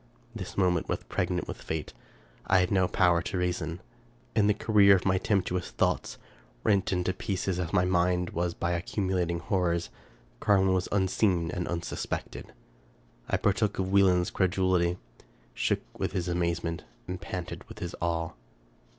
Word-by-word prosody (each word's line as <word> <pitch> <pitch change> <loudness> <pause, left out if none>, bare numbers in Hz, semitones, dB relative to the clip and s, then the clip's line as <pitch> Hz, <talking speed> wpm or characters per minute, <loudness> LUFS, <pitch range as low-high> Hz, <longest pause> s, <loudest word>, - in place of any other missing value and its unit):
This 95 -6 -7
moment 90 -3 +2
was - - -2
pregnant - - -2
with - - -7
fate. 80 -1 -4 0.5
I 95 - +5
had 90 -1 +2
no 95 -2 +3
power 90 -2 +3
to 90 - -3
reason. 90 -1 -2 0.5
In 105 -2 +4
the 105 - +3
career 105 -2 +6
of 90 - -2
my 95 -1 +3
tempestuous 90 -3 0
thoughts, - - 0 0.5
rent 100 -2 +2
into 90 0 0
pieces 95 -1 -2
as 85 -2 -2
my 90 -2 +3
mind 90 0 +1
was 85 0 -1
by 85 - -1
accumulating 90 0 -1
horrors. 85 -1 0 0.5
Car 100 - +4
win 95 0 +3
was 90 -1 0
unseen 95 -3 +2
and 90 - -3
unsuspected. 85 -1 -4 0.8
I - - +2
partook 105 +1 +1
of 95 0 -1
Wieland's 95 -3 +4
credulity, 95 -2 +2 0.6
shook - - 0 0.2
with - - -1
his 90 -2 -1
amazement, 85 -1 -1 0.2
and - - -5
panted - - -5
with - - -10
his 85 - -5
awe. 85 -1 -1
90 Hz, 155 wpm, -29 LUFS, 85-95 Hz, 0.8 s, career